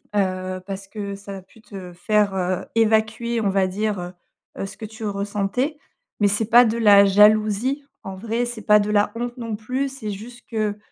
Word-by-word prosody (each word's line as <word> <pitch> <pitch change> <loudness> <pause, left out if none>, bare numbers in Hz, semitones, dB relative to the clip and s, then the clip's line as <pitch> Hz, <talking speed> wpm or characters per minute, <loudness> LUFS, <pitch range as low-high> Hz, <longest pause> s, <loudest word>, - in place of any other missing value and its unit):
Heu, 185 -2 -1
parce 195 0 -6
que 200 -1 -6
ça 200 0 -9
a - - -9
pu 215 +4 -21
te 190 -4 -10
faire, 205 +2 +1
heu, 185 -1 -1
évacuer, 225 +1 +1
on 200 - +1
va 195 -1 +2
dire, 205 +1 -2
heu 175 +1 -6 0.5
heu, - - -2
ce - - -12
que 220 - -7
tu 220 +1 -8
ressentais 205 +8 -2 0.4
mais 205 - +5
c'est 205 +3 +1
pas 240 +2 +7
de 225 0 0
la 205 -3 +7
jalousie, 215 +6 +3 0.2
en 195 - -6
vrai, 230 +4 -2
c'est 240 -2 -6
pas 210 0 +6
de 205 0 -1
la 205 0 +2
honte, 240 +2 -4
non 230 -2 -4
plus, 255 +6 -2
c'est 250 -6 -6
juste 235 +4 -10
que, 215 -2 -1
210 Hz, 205 wpm, -22 LUFS, 195-230 Hz, 0.5 s, pas